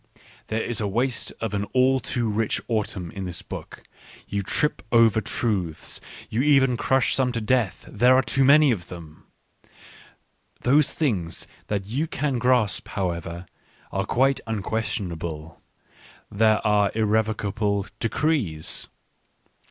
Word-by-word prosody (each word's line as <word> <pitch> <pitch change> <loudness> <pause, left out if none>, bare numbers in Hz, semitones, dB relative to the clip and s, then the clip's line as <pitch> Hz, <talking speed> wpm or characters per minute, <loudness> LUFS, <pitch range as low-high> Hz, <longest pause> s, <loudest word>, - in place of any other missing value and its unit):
There 110 +1 -1
is 120 - -2
the 105 - 0
waste 120 +5 -1
of 115 -2 -2
an 100 0 -1
all 130 +1 +4
too 120 -2 -2
rich 110 0 0
autumn 105 -6 -2
in 95 -1 -6
this 90 -2 -5
book: - - -9 0.4
you 100 +1 -2
trip 150 +9 0
over 115 -2 +5
truths. 95 -10 -2 0.3
You 115 - -1
even 135 -3 +4
crush 130 +1 +2
some 130 -2 +1
to 115 - -1
death, 110 -5 0
there 125 +4 +4
are 130 - +4
too 135 - +1
many 145 +1 +6
of 90 -6 -3
them. 80 -3 -11 1.3
Those 140 +3 +4
things 95 - -1 0.2
that 100 -2 -2
you 135 +10 -2
can 140 -4 -1
grasp, 125 -4 +2
however, 85 -2 -3 0.5
are 95 0 -1
quite 135 +2 +2
unquestionable; 95 -7 -3 0.7
they 110 +1 +3
are 105 -2 +3
irrevocable 105 -2 0
decrees. 115 - -1
110 Hz, 130 wpm, -24 LUFS, 95-125 Hz, 1.3 s, many